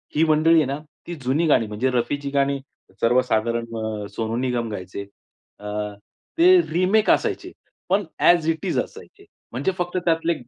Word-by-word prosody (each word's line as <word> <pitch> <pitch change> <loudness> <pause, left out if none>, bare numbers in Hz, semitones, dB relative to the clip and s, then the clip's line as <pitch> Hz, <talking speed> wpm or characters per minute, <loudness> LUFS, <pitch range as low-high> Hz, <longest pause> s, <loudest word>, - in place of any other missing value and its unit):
ही 155 - +4
मंडळी 155 +2 +4
आहे 155 - +4
ना, 140 +2 -3 0.3
ती 175 - -5
जुनी 135 +7 +1
गाणी, 115 -7 +3
म्हणजे 105 +5 -1
रफी 125 +3 0
जी 140 0 -5
गाणी 140 0 +1 0.4
सर्वसाधारण 115 -1 +1
अ, 110 -2 -4
सोनू 115 0 -2
निगम 125 -2 -1
गायचे, 100 0 -6 0.5
अ, 105 - -7 0.7
ते 365 +2 +7
रिमेक 185 +6 +2
असायचे, - - +1 0.4
पण 200 +2 +3 0.2
ॲज 170 -2 +4
इट 160 -1 -2
इज - - -1
असायचे, - - -8 0.3
म्हणजे 135 +10 -1
फक्त 175 0 -2
त्यातले 165 0 +2
140 Hz, 160 wpm, -23 LUFS, 115-165 Hz, 0.7 s, ते